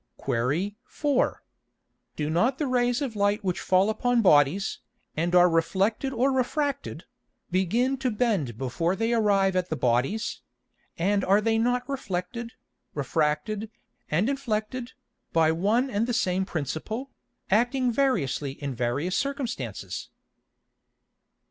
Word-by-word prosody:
Qu. 145 - -1
4. 285 -3 0 0.7
Do 150 0 -2
not 235 +11 +2
the 300 - -1
Rays 245 +1 +1
of 245 -5 -4
Light 205 +1 +1
which 180 -2 -1
fall 185 +1 +3
upon 235 +2 +1
Bodies, 155 +2 +3 0.4
and 170 +3 0
are 180 0 +7
reflected 195 +9 +1
or 265 +2 +2
refracted, 280 +2 -1 0.5
begin 230 +9 +1
to 260 -1 0
bend 205 - 0
before 165 +8 -1
they 225 +3 0
arrive 200 -4 +3
at 180 -1 0
the 160 - -1
Bodies; 130 - 0 0.6
and 200 +3 +1
are 200 +2 +4
they 225 +1 +1
not 245 +2 +1
reflected, 235 -2 -4 0.4
refracted, 155 +9 -1 0.4
and 170 +8 +2
inflected, 250 -2 -2 0.4
by 160 -1 +4
one 210 +10 +2
and 220 +2 0
the 245 - -1
same 185 -1 +1
Principle, 190 - -4 0.4
acting 245 +4 +2
variously 185 - 0
in 140 -1 -5
various 125 +10 -1
Circumstances? 195 - -3
205 Hz, 125 wpm, -26 LUFS, 165-245 Hz, 0.7 s, are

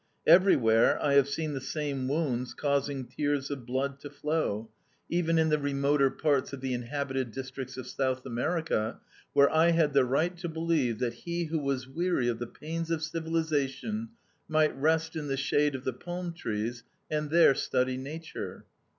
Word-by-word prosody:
Everywhere 135 - +5
I 140 - +1
have 140 -1 +5
seen 155 +1 -2
the 135 - -4
same 140 -2 -3
wounds 130 -4 -1
causing 140 -2 0
tears 140 +2 -1
of 130 -4 -6
blood 135 +2 -1
to 145 - -8
flow, 145 -7 -2 0.4
even 165 -1 +1
in 160 0 +3
the 150 0 +2
remoter 140 0 +2
parts 140 -2 0
of 140 - -5
the 130 -1 -2
inhabited 130 +1 -2
districts 130 +1 -6
of 130 - -5
South 130 -1 -1
America, 125 -2 -1 0.3
where 140 0 +5
I 160 +2 +5
had 165 -4 +3
the 140 -1 +5
right 155 +8 +1
to 175 -1 -4
believe 160 -8 0
that 120 -1 -1
he 170 +8 -3
who 160 0 -1
was 135 -3 -2
weary 165 -2 0
of 115 - -2
the 120 - -4
pains 165 +5 -5
of 165 -1 -1
civilization 160 +5 -1 0.4
might 155 -1 +2
rest 160 +3 +1
in 155 -2 -3
the 135 -1 -1
shade 145 +1 +2
of 130 - -6
the 130 - -1
palm 175 +5 -5
trees 115 -4 -3 0.3
and 150 -1 -1
there 165 -3 +6
study 130 -1 0
nature. 150 +5 -7
140 Hz, 175 wpm, -29 LUFS, 130-160 Hz, 0.4 s, there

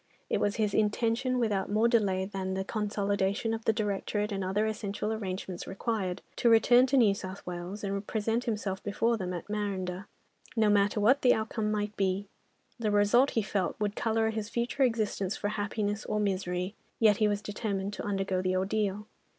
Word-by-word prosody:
It - - +2
was 205 - +1
his 210 -3 0
intention, 230 +4 +1
without 210 -5 0
more 215 +3 +3
delay 200 -6 +2
than 190 -1 -3
the 190 - -1
consolidation 205 0 -1
of 225 0 -5
the - - +5
directorate 210 0 -1
and 195 -1 -2
other 195 +3 +1
essential 210 0 -2
arrangements 190 -3 -5
required, 195 -2 -2
to 240 - +3
return 240 +3 +6
to 275 - +2
New 220 -6 +5
South 190 0 -7
Wales, 180 +4 -6
and 200 0 -3
present 225 +2 -1
himself 205 -5 -2
before 225 +3 +1
them 185 -4 -3
at 175 -2 -5
Marondah, 195 -2 -3 0.5
no 215 -2 +4
matter 205 +1 +3
what 245 +7 +4
the 250 - +5
outcome 220 0 -2
might 210 0 -2
be. 195 0 0 0.5
The 220 -2 0
result 210 +6 +4
he 225 - +3
felt 195 -2 -2
would 205 -1 -1
colour 225 -1 +1
his 220 -1 -4
future 240 +4 -2
existence 215 -6 +1
for 205 - -2
happiness 205 0 -2
or 210 - -1
misery, 185 -2 -1 0.2
yet 215 -3 +5
he 215 - +3
was 205 0 -1
determined 205 -2 -3
to - - -5
undergo 195 -2 -1
the 185 0 0
ordeal. 205 +1 -1
205 Hz, 185 wpm, -30 LUFS, 195-220 Hz, 0.5 s, return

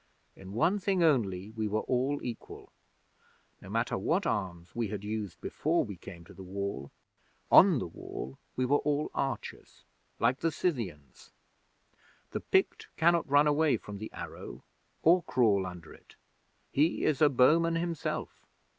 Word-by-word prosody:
In 95 +1 -11
one 175 - +2
thing 190 -2 +1
only 105 - +1
we 110 -1 -2
were 105 +1 0
all 130 +3 0
equal. 120 -2 -8 0.9
No - - -11
matter - - -1
what - - 0
arms 90 -4 -3
we 120 -2 -1
had 100 0 -5
used 105 -3 -4
before - - 0
we - - -7
came 85 -1 -11
to - - -14
the - - -12
Wall, 95 -7 -4 0.6
on 180 -3 +8
the - - -2
Wall 65 -5 -8 0.2
we 130 - 0
were 145 +3 +3
all 150 0 -1
archers, 135 -5 -4 0.3
like 120 +4 +2
the 165 - 0
Scythians. 110 - -4 1.0
The - - -2
Pict - - +1
cannot 170 -1 +3
run 145 +1 +5
away 150 -2 +3
from 105 -1 -9
the 110 - -6
arrow, - - -8 0.4
or 175 +3 +6
crawl 105 - +2
under 90 -3 -10
it. - - -19 0.6
He 155 +5 +2
is 155 -2 +1
a 150 - +7
bowman 160 +6 +4
himself. 165 -2 -3
125 Hz, 155 wpm, -30 LUFS, 100-155 Hz, 1.0 s, on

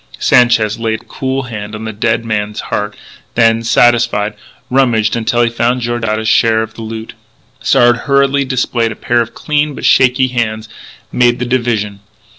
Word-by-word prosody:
Sanchez 115 -3 +3
laid 110 0 -2
a - - -30
cool 135 0 -3
hand 105 -3 -7
on 110 +1 -7
the 110 - -5
dead 115 +2 -1
man's 105 -1 -2
heart; 105 0 -2 0.4
then, 115 -1 +3
satisfied, 115 -3 +2 0.4
rummaged 120 -5 +2
until 120 +1 +1
he 115 - +2
found 120 +2 0
Georgiades' 110 -2 -2
share 110 0 +3
of 110 0 -9
the 115 - -10
loot. 110 0 -7 0.5
Sard, 120 -2 +4
hurriedly 140 +1 +1
displaying 120 -3 -1
a - - -6
pair 120 -1 0
of 115 0 -5
clean 150 -1 -1
but - - -6
shaky 130 0 +4
hands, 110 -3 -2 0.4
made 120 -1 +2
the 125 - -3
division. 115 -5 -1
115 Hz, 165 wpm, -14 LUFS, 110-125 Hz, 0.5 s, Sard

